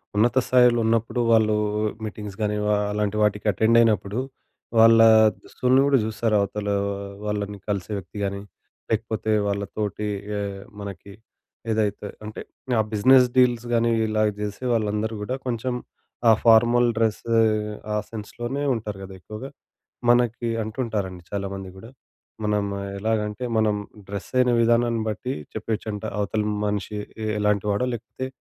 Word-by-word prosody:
ఉన్నత 120 +5 +3
స్థాయిలో 125 -1 +5
ఉన్నప్పుడు 115 +2 +1
వాళ్ళు 110 -1 +4 0.5
మీటింగ్స్ 105 -1 -7
గాని 105 0 0
వా 105 - +2 0.2
అలాంటి 105 0 -1
వాటికి 105 0 +1
అటెండయినప్పుడు 110 0 +3 0.6
వాళ్ళ 115 0 +7 0.4
దుస్తుల్ని 130 +1 +2
గూడా 140 -1 +4
చూస్తారు. 110 0 0
అవతల 105 +1 -3 0.6
వాళ్ళని 105 -1 -3
కలిసే 100 0 -2
వ్యక్తి 95 +2 -9
గాని 100 0 -2 0.5
లేకపోతే 110 0 -1 0.2
వాళ్ళ 100 0 -1
తోటి 105 0 -2 0.3
ఆహ్, 100 -1 -5 0.2
మనకి 100 0 -8 0.6
ఏదైతే 105 -1 -1 0.2
అంటే 105 - -7 0.4
ఆ - - +6
బిజినెస్ 125 +5 +6
డీల్స్ 120 -2 +3
గానీ 115 0 +3 0.2
ఇలాగ 110 0 +2
జేసే 105 +4 -4
వాళ్ళందరూ 110 0 0
గూడా 125 +5 -2
కొంచెం 125 +1 -2 0.6
ఆ - - +9
ఫార్మల్ 120 +1 +6
డ్రెస్ 110 -1 +1 0.7
ఆ - - 0
సెన్స్‌లోనే 120 +5 -5
ఉంటారు 105 -3 -5
గదా! 95 0 -9
ఎక్కువగా. 110 +8 -8 0.6
మనకి 120 -1 +2
అంటుంటారండి 105 -5 -3
చాలామంది 100 -1 -4
గూడా. 110 +4 -11 0.5
మనం 105 -1 +1 0.4
ఎలాగంటే 110 +2 -1
మనం 110 -1 +2 0.3
డ్రెస్ 100 -1 -6
అయిన 125 -1 +4
విధానాన్ని 115 0 +2
బట్టి 125 +5 -3 0.2
చెప్పేయొచ్చంట 110 -2 -4 0.2
అవతలి 105 +1 -1 0.2
మనిషి 105 0 -2 0.3
ఎ - - -1
ఎలాంటి 105 -1 +1
వాడో, 105 +6 0
లేకపోతే 120 +3 -6
110 Hz, 130 wpm, -24 LUFS, 105-115 Hz, 0.7 s, ఆ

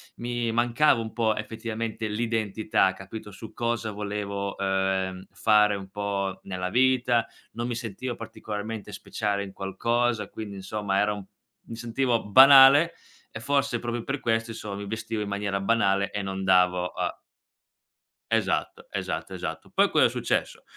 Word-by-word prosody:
mi 120 -1 -2
mancava 120 +2 +3
un 110 - -6
po', 110 -2 +1
effettivamente, 110 0 -4
l'identità, 110 -3 0
capito, 105 +2 -9
su 110 +2 -10
cosa 115 -2 -2
volevo, 100 -1 -4
ehm, 95 -1 -1
fare 105 -1 +4
un 95 -1 -7
po' 100 -1 -3
nella 90 -1 -4
vita, 125 0 +3 0.3
non 120 +1 -3
mi 120 - -2
sentivo 115 +2 -5
particolarmente 110 -1 -6
speciale 100 0 -2
in 95 -1 -9
qualcosa. 115 +4 -1
Quindi, 100 -3 -7
insomma, 100 0 -2
era 105 +1 +2
un 100 -2 -8 0.4
mi 115 - -8
sentivo 120 +1 0
banale 135 +7 +8 0.4
e 115 - -7
forse 140 0 0
proprio 120 -1 -3
per 135 +3 -3
questo, 115 -1 0
inso 105 -2 -6
mi 100 0 -6
vestivo 110 0 -4
in 100 - -3
maniera 100 -1 -2
banale 100 -2 +2
e 100 - -2
non 95 0 -4
davo 90 -1 +3
a - - -3 1.1
Esatto, - - 0
esatto, - - -4
esatto. - - -6
Poi, - - +4
cosa - - +4
è - - +4
successo. - - -2
110 Hz, 150 wpm, -26 LUFS, 100-115 Hz, 1.1 s, banale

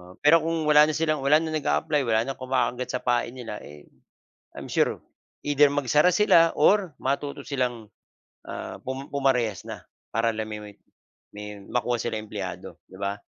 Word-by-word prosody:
Oo 90 +1 -15
pero 165 +3 +7
kung 165 -1 -1
wala 150 0 +7
na 155 - 0
silang 155 -2 0
wala 145 +2 +5
na 160 -1 -4
nag-a-apply 155 0 0
wala 115 -1 +2
na - - -1
kumakagat 130 -1 -1
sa - - -4
pain 120 -1 +1
nila, 115 -4 -6
eh, 75 0 -13 0.7
I'm - - -7
sure - - +1 0.5
either 145 0 +5
magsara 145 +4 +3
sila 165 -5 +5
or 190 -7 +3
matuto 140 +1 -2
silang, 125 -5 -2 0.6
ah, - - -7
pum-pumarehas 130 -4 -1
na - - -7 0.3
para 115 +1 +1
la 110 - -2
me 105 -1 -6
me 105 - -9 0.7
may 105 0 -8
makuha 120 +2 -1
sila 120 - -2
empleyado, 105 -4 -7
'di 95 - -13
ba? 100 0 -1
130 Hz, 165 wpm, -25 LUFS, 110-150 Hz, 0.7 s, pero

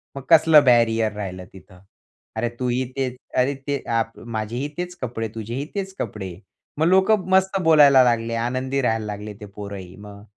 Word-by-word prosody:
मग 135 - -6
कसलं 155 -1 +7
बॅरियर 115 -3 +3
राहिलं 95 -3 -6
तिथं? 95 -1 -16 0.6
"अरे, 115 +2 -1
तूही 125 0 0
तेच 130 -2 -2 0.2
अरे, 130 +3 +2
ते 140 -1 -1 0.2
आप 115 0 -2 0.2
माझेही 115 +6 -3
तेच 180 0 -4
कपडे 115 -3 -3
तुझेही 115 +5 -4
तेच 195 -1 -4
कपडे." 95 -4 -5 0.4
मग 155 - +2
लोक 190 +3 +4 0.2
मस्त 190 +1 +2
बोलायला 145 -5 +7
लागले, 115 -1 0
आनंदी 130 +3 -1
राहायला 115 -3 0
लागले 105 0 -6
ते - - -7
पोरंही 100 -3 -8
मग. 100 0 -12
120 Hz, 160 wpm, -22 LUFS, 105-140 Hz, 0.6 s, कसलं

